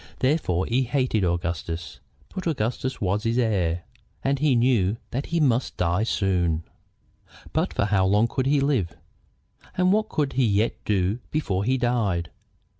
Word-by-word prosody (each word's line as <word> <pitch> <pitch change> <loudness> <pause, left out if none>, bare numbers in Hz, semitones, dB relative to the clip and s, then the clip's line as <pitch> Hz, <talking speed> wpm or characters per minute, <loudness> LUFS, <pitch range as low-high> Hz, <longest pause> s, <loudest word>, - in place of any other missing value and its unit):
Therefore 130 - +1
he 125 +3 +1
hated 125 -4 0
Augustus. 85 -1 -2 0.3
But 185 -2 -4
Augustus 130 -2 -2
was 100 +1 0
his 115 +1 0
heir, 90 -8 +1 0.4
and 135 0 +1
he 145 -3 +3
knew 115 -4 +2
that 135 +4 -3
he 170 - 0
must 130 -5 +1
die 90 +2 +1
soon. 90 -7 +1 0.9
But - - +1
for - - +2
how 95 -2 +2
long 105 +4 +3
could 130 +2 -1
he 140 0 +3
live? 110 - 0 0.8
And 185 +1 +4
what 215 +1 +1
could 145 -3 -1
he 130 -1 +2
yet 105 +2 +2
do 100 +2 +1
before 100 -11 -1
he 130 +2 +2
died? 110 -9 0
115 Hz, 155 wpm, -25 LUFS, 95-130 Hz, 0.9 s, And